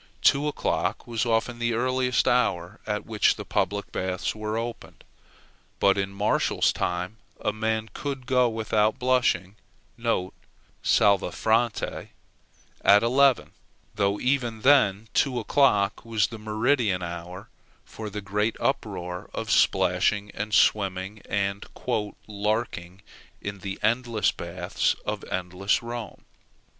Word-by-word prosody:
Two 145 +2 +4
o'clock 150 - -1
was 120 0 -2
often 115 +1 0
the 120 -1 0
earliest 125 +1 +1
hour 90 -8 +1
at 105 -1 -2
which 110 -2 +2
the - - -7
public 100 0 -1
baths 95 0 -2
were 110 0 -3
opened. 115 0 -6 0.8
But 100 - +4
in 95 -1 -1
Martial's 100 +2 +1
time 90 +4 -2 0.2
a 105 - -1
man 110 0 -1
could 135 -3 -5
go 125 -1 +3
without 110 -1 +1
blushing 125 -7 +1 0.5
(salvâ 100 -1 0
fronte) 115 +1 0 0.7
at 100 +1 +6
eleven, 130 +2 +3 0.4
though 100 0 0
even 125 -4 0
then 110 -6 +4
two 130 -3 +2
o'clock 110 -4 +2
was 110 -3 +1
the 115 - -8
meridian 110 -2 +1
hour 85 +2 -7 0.4
for 110 -1 -7
the 105 +1 -5
great 105 +2 -1
uproar 95 -9 -2
of - - -3
splashing, 105 -1 +2
and 105 +1 -5
swimming, 95 0 +2
and 100 0 -1 0.6
"larking" 105 -3 -3 0.4
in 100 0 -6
the 95 +1 -5
endless 115 -2 +2
baths - - -1
of - - -3
endless 95 +4 -1
Rome. 120 -2 -7
110 Hz, 120 wpm, -26 LUFS, 100-120 Hz, 0.8 s, at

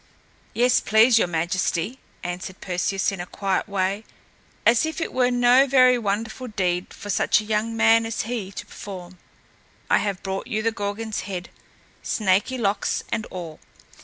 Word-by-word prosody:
"Yes, 245 +1 +4
please 225 +2 +5
your 180 - +2
Majesty," 175 +6 -1 0.2
answered 180 +1 -5
Perseus, 190 +2 -1
in 195 -3 -5
a 175 - -7
quiet 195 0 -2
way, 195 +1 -1 0.6
as 230 0 +5
if 315 +1 -3
it 325 - -3
were 250 -1 +3
no 245 +2 +5
very 255 -1 +6
wonderful 225 +2 -2
deed 180 -4 -1
for 205 -2 -6
such - - +3
a - - -5
young 220 +1 -1
man 225 0 +4
as 230 - -2
he 220 -4 -4
to - - -7
perform. 185 -2 -9 0.7
"I - - +5
have 200 -2 -3
brought 195 0 -4
you 215 0 -2
the 225 - +2
Gorgon's 210 +1 -3
head, 185 -2 -5 0.5
snaky 205 +5 +1
locks 200 -3 0
and 225 -2 -2
all!" 170 -4 -8
210 Hz, 160 wpm, -24 LUFS, 190-230 Hz, 0.7 s, very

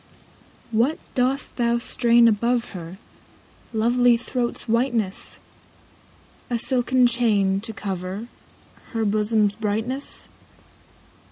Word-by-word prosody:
What 240 +8 +2 0.2
dost 260 +2 -1
thou 235 -1 +2
strain 235 0 +4
above 235 +2 +1
her 180 -1 -8 0.7
Lovely 240 +2 +3
throat's 245 0 -3
whiteness? 230 -4 -1 1.1
A 240 - 0
silken 250 +1 +3
chain, 210 -5 +2
to 225 +1 -5
cover 195 +1 -5 0.7
Her 225 -1 0
bosom's 210 0 +2
brightness 225 +6 -3
230 Hz, 90 wpm, -23 LUFS, 210-245 Hz, 1.1 s, strain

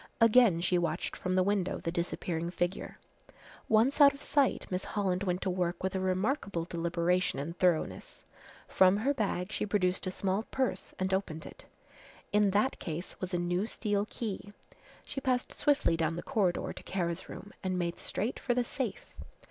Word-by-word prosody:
Again 230 -6 +6
she 180 0 +2
watched 175 - -2
from 185 0 -2
the 185 - +4
window 195 -1 0
the 165 - -3
disappearing 170 -1 -2
figure. 175 +1 -2 0.7
Once 235 +7 +4
out 280 -1 +8
of 280 - -12
sight 280 -3 +2
Miss 180 +1 -1
Holland 190 -3 -1
went 180 -2 -1
to 190 - 0
work 180 -1 -1
with 190 0 0
a - - +1
remarkable 190 - 0
deliberation 170 0 0
and 155 +5 -4
thoroughness. 180 -3 0 0.4
From 190 +1 +5
her 265 +7 +1
bag 200 -6 -1
she - - -1
produced 185 -3 0
a - - -1
small 190 +2 0
purse 260 -1 -2
and 190 0 -1
opened 160 -5 -2
it. - - -11 0.7
In 210 -1 +4
that 210 +7 +1
case 170 +2 -5
was 185 0 -3
a 180 - 0
new 175 +4 0
steel 205 -3 -1
key. 205 -2 -5 0.5
She 270 - -5
passed 255 -2 0
swiftly 290 - +2
down 165 0 0
the 175 - -5
corridor 200 -9 0
to - - -10
Kara's 170 -3 -3
room 205 - -9
and 185 -1 -1
made 170 -1 -2
straight 220 +6 -3
for 245 - 0
the 250 - +2
safe. 240 -4 -4
190 Hz, 180 wpm, -31 LUFS, 175-215 Hz, 0.7 s, out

